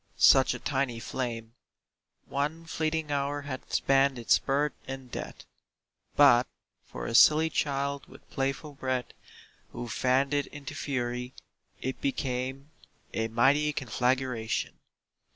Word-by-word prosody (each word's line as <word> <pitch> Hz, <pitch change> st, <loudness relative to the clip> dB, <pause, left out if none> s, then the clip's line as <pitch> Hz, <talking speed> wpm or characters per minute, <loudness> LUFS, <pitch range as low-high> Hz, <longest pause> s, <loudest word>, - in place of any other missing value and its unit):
such 135 Hz, -1 st, +6 dB
a -, -, -6 dB
tiny 135 Hz, -4 st, -1 dB
flame— 115 Hz, -2 st, -4 dB, 0.7 s
One 150 Hz, +4 st, -2 dB
fleeting 160 Hz, -1 st, -2 dB
hour 145 Hz, 0 st, -1 dB
had 130 Hz, -2 st, -7 dB
spanned 135 Hz, -1 st, +3 dB
its 115 Hz, -, +3 dB
birth 145 Hz, +2 st, 0 dB
and 135 Hz, -2 st, -7 dB
death, -, -, -7 dB, 0.7 s
But 130 Hz, -4 st, +6 dB, 0.4 s
for -, -, -7 dB
a -, -, -3 dB
silly 155 Hz, +6 st, +6 dB
child 140 Hz, -1 st, -1 dB
with -, -, -16 dB
playful 135 Hz, +2 st, -2 dB
breath 130 Hz, -2 st, -3 dB, 0.6 s
Who 120 Hz, -, -5 dB
fanned 130 Hz, +4 st, +1 dB
it 145 Hz, -1 st, +1 dB
into 145 Hz, -3 st, -8 dB
fury. 125 Hz, -2 st, -3 dB, 0.5 s
It 130 Hz, 0 st, -3 dB
became 135 Hz, +1 st, -3 dB, 0.4 s
A 115 Hz, 0 st, 0 dB
mighty 135 Hz, +7 st, +3 dB
conflagration. 125 Hz, -2 st, -1 dB
135 Hz, 120 wpm, -29 LUFS, 125-145 Hz, 0.7 s, such